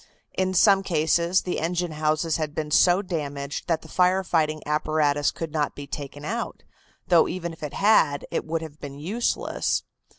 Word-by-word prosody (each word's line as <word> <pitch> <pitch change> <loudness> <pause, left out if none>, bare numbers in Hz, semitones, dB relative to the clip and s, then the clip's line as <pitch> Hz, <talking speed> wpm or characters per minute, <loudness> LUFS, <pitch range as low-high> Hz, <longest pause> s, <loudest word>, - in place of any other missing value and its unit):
In 185 0 -1
some 195 +1 +6
cases 170 0 +2
the 180 - -2
engine 175 +1 -1
houses 155 +1 0
had 155 -2 -3
been 155 -1 -3
so 180 +5 +5
damaged 145 -5 -4
that 165 -2 0
the - - -12
fire 185 +1 +2
fighting 155 -3 0
apparatus 150 -1 +1
could 165 -2 -5
not 150 -2 -1
be 145 - -7
taken 145 0 -7
out, 230 +7 -4 0.5
though 170 -3 +5
even 170 -2 -4
if 165 - -15
it 150 -2 -5
had 165 -9 +3
it - - -1
would 165 +1 -3
have 155 -1 -10
been 140 -1 -7
useless. 200 +11 -1
160 Hz, 175 wpm, -25 LUFS, 150-180 Hz, 0.5 s, some